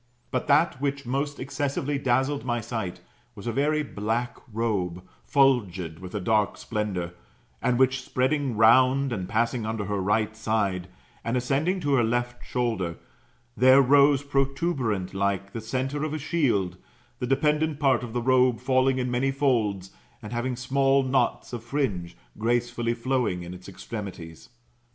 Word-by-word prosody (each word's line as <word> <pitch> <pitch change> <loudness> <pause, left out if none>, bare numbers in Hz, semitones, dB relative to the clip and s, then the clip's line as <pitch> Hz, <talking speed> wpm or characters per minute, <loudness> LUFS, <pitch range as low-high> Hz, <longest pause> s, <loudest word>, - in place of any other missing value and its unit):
But 130 - -2
that 145 -1 +3
which 140 -1 -2
most 140 +3 -2
excessively 140 +1 -2
dazzled 135 +2 +1
my 120 -1 -1
sight, 110 -5 -4 0.3
was 100 - -10
a 120 - -1
very 150 +5 +1
black 115 0 -2 0.2
robe, 100 -6 -1 0.3
fiilgid 100 - +2
with 90 -1 -8
a - - 0
dark 105 +1 +1
splendour, 100 -6 -3 0.5
and 125 -1 +1
which, 130 +1 +3
spreading 130 -1 0
round 130 +4 +5
and 95 -4 -4
passing 115 +2 0
under 110 -1 -3
her 100 0 -2
right 105 +2 +1
side, 105 -5 -1 0.4
and 115 +2 0
ascending 145 +9 0
to 145 -3 0
her 125 -3 +4
left 120 +1 -1
shoulder, 110 -9 -2 0.6
there 130 +2 +6
rose 140 +1 +5
protuberant 135 - -1
like 100 0 -1
the 115 - -4
centre 130 +6 -2
of 155 0 -2
a - - -1
shield, 130 - 0 0.4
the 125 - -2
dependant 150 +3 +1
part 135 -5 +3
of 120 - -6
the 120 -1 -1
robe 125 -2 +3
falling 130 +1 +2
in 125 -1 -1
many 125 +2 +1
folds, 115 -9 0 0.3
and 105 +2 -8
having 125 +2 -1
small 135 +2 +2
knots 130 -1 0
of 120 -2 -5
fringe, 115 -10 -2 0.2
gracefully 120 +1 0
flowing 120 -7 -1
in 85 +1 -7
its 90 +1 -11
extremities. 95 -5 -8
120 Hz, 155 wpm, -26 LUFS, 105-135 Hz, 0.6 s, there